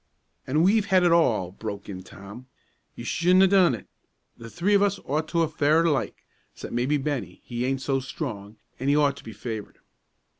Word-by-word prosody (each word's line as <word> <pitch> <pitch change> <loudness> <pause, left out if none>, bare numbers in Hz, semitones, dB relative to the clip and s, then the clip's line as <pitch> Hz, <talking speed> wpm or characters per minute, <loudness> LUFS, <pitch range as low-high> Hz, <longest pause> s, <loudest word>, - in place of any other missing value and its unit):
"An' 150 +5 +2
we've 205 +2 +3
had 185 -2 +4
it 175 - +4
all!" 115 - +2
broke 100 0 -7
in 95 -2 -7
Tom. 100 +7 -12 0.5
"You - - -8
shouldn't 180 +2 +3
a - - +6
done 185 -8 +4
it. 110 - -12 0.5
The 115 0 -11
three 185 - 0
of 200 - +5
us 200 -1 +1
ought 155 +3 -1
to 170 0 +1
a' - - +1
fared 155 +2 +2
alike 150 -5 -1 0.3
'cept, - - -8
maybe, 125 +5 +1
Bennie; 145 -1 -4
he 120 0 -3
aint 135 0 -1
so 135 -1 0
strong, 110 -7 -6 0.2
an' 130 - -3
he 140 - +4
ought 145 -2 +3
to - - -12
be 115 - -9
favored." 110 -2 -7
140 Hz, 200 wpm, -25 LUFS, 115-170 Hz, 0.5 s, a